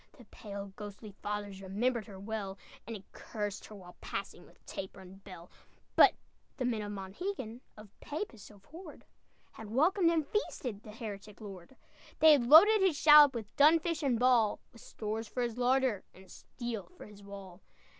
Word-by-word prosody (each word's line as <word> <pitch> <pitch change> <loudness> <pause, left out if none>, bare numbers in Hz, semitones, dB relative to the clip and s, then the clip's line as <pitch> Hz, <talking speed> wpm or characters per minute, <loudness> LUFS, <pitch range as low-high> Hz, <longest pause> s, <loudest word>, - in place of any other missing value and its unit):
The 245 - -15
pale, 200 -2 -9
ghostly 210 0 -9
fathers 205 -2 -5
Remembered 215 +4 -1
her 195 -3 -10
well, 200 -1 -5 0.3
And 230 - -5
had 195 -2 -13
cursed 210 -2 -5
her 215 - -11
while 180 -3 -13
passing, - - -6
With - - -24
taper 190 0 -7
and 190 +1 -14
bell; 180 -3 -12 0.4
But - - +7 0.4
the 255 - -2
men 230 -3 -1
of 205 0 -5
Monhegan, 220 - -6 0.2
Of 215 0 -12
Papists 295 - -6
abhorred, 280 - -13 0.5
Had 220 -2 -11
welcomed 335 - +3
and 325 -3 +1
feasted 250 - -3
The 215 - -11
heretic 210 -2 -8
Lord. 195 +1 -11 0.4
They 315 0 +7
had 265 -6 +4
loaded 405 - +8
his 370 -6 +2
shallop 295 -3 +8
With 220 -3 -7
dun 305 +3 +7
fish 330 -1 -3
and 265 -5 +1
ball, 240 -3 +3
With 230 - -15
stores 220 +1 -5
for 245 +4 -3
his 240 0 -4
larder, 250 -4 +2
And 190 0 -16
steel 235 -5 -7
for - - -10
his 210 -1 -14
wall. 195 -2 -11
220 Hz, 175 wpm, -32 LUFS, 200-265 Hz, 0.5 s, loaded